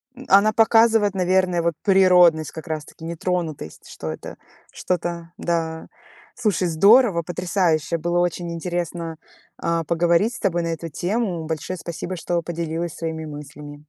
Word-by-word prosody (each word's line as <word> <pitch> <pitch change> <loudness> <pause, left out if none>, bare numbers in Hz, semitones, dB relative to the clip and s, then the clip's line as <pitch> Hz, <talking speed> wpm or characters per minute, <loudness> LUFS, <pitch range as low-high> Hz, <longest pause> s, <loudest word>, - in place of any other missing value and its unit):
М, 260 - -11
она 205 +3 +5
показывает, 225 -2 +4
наверное, 185 -1 +2
вот 170 0 0
природность 180 -5 +5
как 160 +1 -9
раз-таки, 155 +1 -6
нетронутость, 165 - -4
что 80 - -6
это 80 - -8 0.3
что-то, 170 -1 -3
да. 165 -1 -2 0.5
Слушай, 205 -7 0
здорово, 200 +2 +5
потрясающе, 175 -2 0
было 175 +2 0
очень 175 -1 -1
интересно, 170 -1 -4 0.4
а, 170 0 -1
поговорить 170 +7 +2
с - - -8
тобой 175 -4 0
на - - -2
эту 165 0 -4
тему. 180 0 -2
Большое 160 +3 -4
спасибо, 170 +2 -5
что 170 0 -2
поделилась 165 0 -4
своими 160 -1 -4
мыслями. 145 0 -10
170 Hz, 140 wpm, -22 LUFS, 160-185 Hz, 0.5 s, она